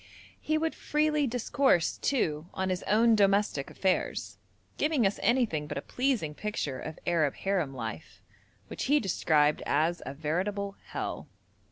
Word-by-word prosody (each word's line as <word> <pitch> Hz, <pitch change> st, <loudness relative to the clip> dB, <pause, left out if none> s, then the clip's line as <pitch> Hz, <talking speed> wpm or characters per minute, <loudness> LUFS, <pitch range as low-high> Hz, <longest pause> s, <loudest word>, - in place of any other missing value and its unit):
He 310 Hz, 0 st, 0 dB
would 320 Hz, +1 st, 0 dB
freely 300 Hz, -1 st, +1 dB
discourse, 245 Hz, -, +2 dB
too, 160 Hz, -, 0 dB
on 190 Hz, 0 st, -1 dB
his 185 Hz, -, -2 dB
own 230 Hz, +2 st, +5 dB
domestic 200 Hz, -8 st, +2 dB
affairs, 190 Hz, -1 st, -1 dB, 0.4 s
giving 300 Hz, -7 st, +2 dB
us 195 Hz, -, 0 dB
anything 225 Hz, -, +1 dB
but -, -, -5 dB
a -, -, -2 dB
pleasing 250 Hz, -, -1 dB
picture 150 Hz, -8 st, -3 dB
of 155 Hz, 0 st, -7 dB
Arab 160 Hz, -5 st, +1 dB
harem 180 Hz, -9 st, -1 dB
life, 110 Hz, -9 st, -6 dB, 0.5 s
which -, -, -5 dB
he 295 Hz, +2 st, +4 dB
described 155 Hz, -, +2 dB
as 160 Hz, +4 st, +1 dB
'a 135 Hz, -, -6 dB
veritable 195 Hz, +7 st, -2 dB
hell.' -, -, -5 dB
195 Hz, 145 wpm, -29 LUFS, 155-240 Hz, 0.5 s, own